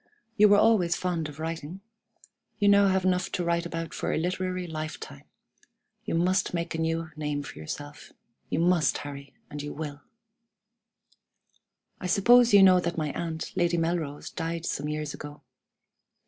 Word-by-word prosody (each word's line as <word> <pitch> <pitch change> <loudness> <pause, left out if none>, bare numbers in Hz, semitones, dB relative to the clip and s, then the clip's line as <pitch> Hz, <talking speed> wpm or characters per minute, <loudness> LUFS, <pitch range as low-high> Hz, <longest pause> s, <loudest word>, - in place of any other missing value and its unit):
You 210 -2 +6
were 205 - +6
always 185 -6 +4
fond 170 -4 -2
of 145 - -11
writing. 160 +2 -5 0.8
You 205 -2 +5
have 190 -2 +3
now - - +5
enough 180 0 -1
to 180 - -1
write 170 0 0
about 165 -1 -5
for - - -2
a - - 0
literary 185 +2 -2
lifetime. 155 -2 -7 0.8
You - - -2
must 180 +2 +1
make 170 0 -3
a 160 - -3
new 165 0 -1
name 150 -1 -3
for 135 - -10
yourself. 145 - -8 0.4
You - - -1
must 175 -2 +3
Harry, 140 -1 -9 0.2
and 150 - -5
you 145 0 -6
will! 145 -2 -6 2.0
"I 180 - -4
suppose 240 +6 +5
you 200 -1 +8
know 185 -1 +7
that 170 -1 -3
my 155 -2 -1
aunt, 160 0 -5
Lady 175 -1 +1
Melrose, 165 -3 -2
died 165 0 -4
some 145 +2 -2
years 150 -1 -3
ago? 145 0 -10
170 Hz, 160 wpm, -27 LUFS, 150-185 Hz, 2.0 s, you